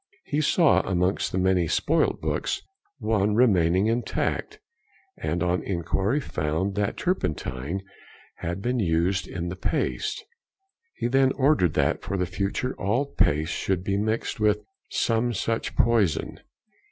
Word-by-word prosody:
He 150 Hz, -, -1 dB
saw 155 Hz, -, +4 dB
amongst 90 Hz, +1 st, 0 dB
the -, -, -2 dB
many 95 Hz, -2 st, +2 dB
spoilt 160 Hz, -, +1 dB
books -, -, -2 dB, 0.3 s
one 105 Hz, -4 st, +1 dB
|168| -, -, 0 dB
remaining 95 Hz, -6 st, +4 dB
intact, 120 Hz, -, -1 dB, 0.6 s
and 85 Hz, 0 st, -1 dB
on 90 Hz, +1 st, +1 dB
inquiry 95 Hz, -, 0 dB
found 80 Hz, -, -2 dB
that 105 Hz, 0 st, -1 dB
turpentine 85 Hz, -, -2 dB, 0.5 s
had 90 Hz, +4 st, -4 dB
been 125 Hz, +1 st, 0 dB
used 90 Hz, +1 st, +1 dB
in 85 Hz, -1 st, -4 dB
the 90 Hz, -, -4 dB
paste. 90 Hz, -, -1 dB, 0.8 s
He -, -, -4 dB
then 135 Hz, +1 st, +3 dB
ordered 135 Hz, -, +2 dB
that 70 Hz, -2 st, +1 dB
for 100 Hz, -, -3 dB
the 90 Hz, -, +1 dB
future 100 Hz, +8 st, -2 dB
all 115 Hz, +8 st, +1 dB
paste 75 Hz, +3 st, +2 dB
should 95 Hz, -2 st, -1 dB
be 100 Hz, 0 st, 0 dB
mixed 110 Hz, +2 st, -1 dB
with 105 Hz, -1 st, +2 dB, 0.3 s
some 115 Hz, +1 st, +1 dB
such 115 Hz, +2 st, -2 dB
poison. 110 Hz, -9 st, +2 dB
100 Hz, 140 wpm, -26 LUFS, 90-115 Hz, 0.8 s, saw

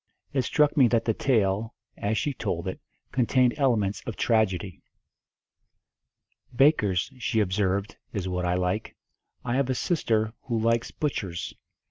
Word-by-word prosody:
It 135 Hz, -, +2 dB
struck 150 Hz, +4 st, +2 dB
me 135 Hz, -5 st, +6 dB
that 115 Hz, -1 st, +1 dB
the 115 Hz, -, +2 dB
tale, 110 Hz, -3 st, +1 dB, 0.2 s
as 105 Hz, +2 st, -1 dB
she 145 Hz, +6 st, 0 dB
told 85 Hz, -7 st, -3 dB
it, 95 Hz, -, -4 dB, 0.3 s
contained 125 Hz, -1 st, +3 dB
elements 115 Hz, -8 st, +1 dB
of 115 Hz, -, -3 dB
tragedy. 100 Hz, -5 st, 0 dB, 1.7 s
"Bakers," 120 Hz, -, +3 dB
she 115 Hz, -2 st, 0 dB
observed, 100 Hz, 0 st, 0 dB
"is 95 Hz, -3 st, -3 dB
what 90 Hz, -1 st, -2 dB
I 90 Hz, 0 st, +1 dB
like. 90 Hz, +4 st, -2 dB, 0.5 s
I 120 Hz, +1 st, 0 dB
have 135 Hz, -1 st, +1 dB
a 130 Hz, -, +1 dB
sister 110 Hz, -9 st, 0 dB
who 120 Hz, -3 st, -2 dB
likes 115 Hz, +1 st, +1 dB
butchers. 95 Hz, -, -3 dB
110 Hz, 140 wpm, -26 LUFS, 95-125 Hz, 1.7 s, me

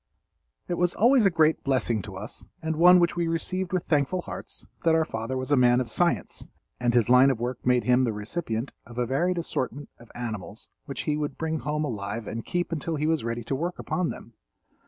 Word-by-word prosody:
It 175 Hz, -, -2 dB
was 175 Hz, 0 st, +1 dB
always 235 Hz, 0 st, +5 dB
a -, -, +5 dB
great 160 Hz, -2 st, +2 dB
blessing 120 Hz, -5 st, +1 dB
to 95 Hz, -2 st, -8 dB
us 105 Hz, +4 st, -7 dB, 0.2 s
and 160 Hz, 0 st, -1 dB
one 180 Hz, +3 st, +7 dB
which 175 Hz, 0 st, +2 dB
we 170 Hz, -1 st, 0 dB
received 180 Hz, +3 st, -2 dB
with 185 Hz, -2 st, 0 dB
thankful 155 Hz, +4 st, +1 dB
hearts, -, -, -8 dB, 0.2 s
that 165 Hz, -1 st, +4 dB
our 160 Hz, -1 st, +3 dB
father 115 Hz, -1 st, -4 dB
was 130 Hz, +2 st, -4 dB
a -, -, +6 dB
man 125 Hz, -1 st, +5 dB
of 120 Hz, -3 st, -3 dB
science, 150 Hz, -, 0 dB, 0.3 s
and 120 Hz, -1 st, +1 dB
his 120 Hz, -3 st, +4 dB
line 125 Hz, +2 st, +7 dB
of 130 Hz, -4 st, 0 dB
work 125 Hz, +1 st, -4 dB
made 125 Hz, -1 st, +4 dB
him 125 Hz, +1 st, +3 dB
the 120 Hz, -, +1 dB
recipient 110 Hz, +3 st, -3 dB
of 120 Hz, 0 st, -13 dB
a 125 Hz, -, +1 dB
varied 170 Hz, +9 st, 0 dB
assortment 145 Hz, -4 st, -3 dB
of 120 Hz, -, -16 dB
animals 110 Hz, -3 st, -6 dB, 0.2 s
which 135 Hz, -3 st, -4 dB
he 150 Hz, -1 st, -1 dB
would 150 Hz, -1 st, -3 dB
bring 160 Hz, -1 st, -2 dB
home 150 Hz, +1 st, -1 dB
alive 110 Hz, -3 st, -4 dB
and 115 Hz, 0 st, -6 dB
keep 175 Hz, 0 st, -1 dB
until 165 Hz, 0 st, -2 dB
he 150 Hz, 0 st, -1 dB
was 160 Hz, -3 st, +1 dB
ready 115 Hz, 0 st, -3 dB
to 115 Hz, -, -3 dB
work 170 Hz, +6 st, -2 dB
upon 180 Hz, -2 st, -1 dB
them. 115 Hz, -, -9 dB
135 Hz, 220 wpm, -26 LUFS, 120-165 Hz, 0.3 s, one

